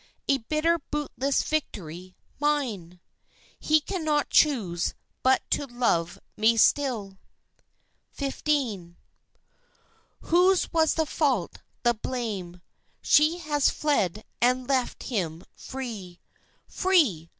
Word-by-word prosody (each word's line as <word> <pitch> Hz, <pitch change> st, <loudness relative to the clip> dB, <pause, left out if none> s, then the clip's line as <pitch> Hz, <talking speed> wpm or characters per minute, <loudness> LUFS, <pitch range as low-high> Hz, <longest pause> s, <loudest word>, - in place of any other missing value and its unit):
A 275 Hz, -1 st, +3 dB
bitter, 310 Hz, +7 st, +1 dB
bootless 280 Hz, -2 st, -1 dB
victory 185 Hz, -, -4 dB, 0.2 s
mine, 235 Hz, -, -1 dB, 0.6 s
He 310 Hz, 0 st, +3 dB
cannot 310 Hz, -3 st, -1 dB
choose 200 Hz, -, +2 dB, 0.3 s
but 260 Hz, 0 st, +3 dB
to 285 Hz, -, 0 dB
love 230 Hz, -9 st, 0 dB, 0.2 s
me 225 Hz, +2 st, +3 dB
still! 220 Hz, -7 st, +2 dB, 1.0 s
XV. 265 Hz, -, -2 dB, 1.3 s
Whose 360 Hz, +2 st, +3 dB
was 320 Hz, -1 st, +3 dB
the 320 Hz, -, +1 dB
fault, 295 Hz, -3 st, -1 dB, 0.2 s
the 240 Hz, -1 st, +4 dB
blame? 210 Hz, -7 st, -5 dB, 0.4 s
She 305 Hz, +3 st, +4 dB
has 295 Hz, -4 st, +1 dB
fled 215 Hz, -, 0 dB, 0.2 s
and 250 Hz, +1 st, +2 dB
left 265 Hz, -3 st, -1 dB
him 175 Hz, -8 st, -3 dB
free, 215 Hz, -9 st, -7 dB, 0.5 s
Free! 280 Hz, -, +2 dB
255 Hz, 95 wpm, -26 LUFS, 195-300 Hz, 1.3 s, the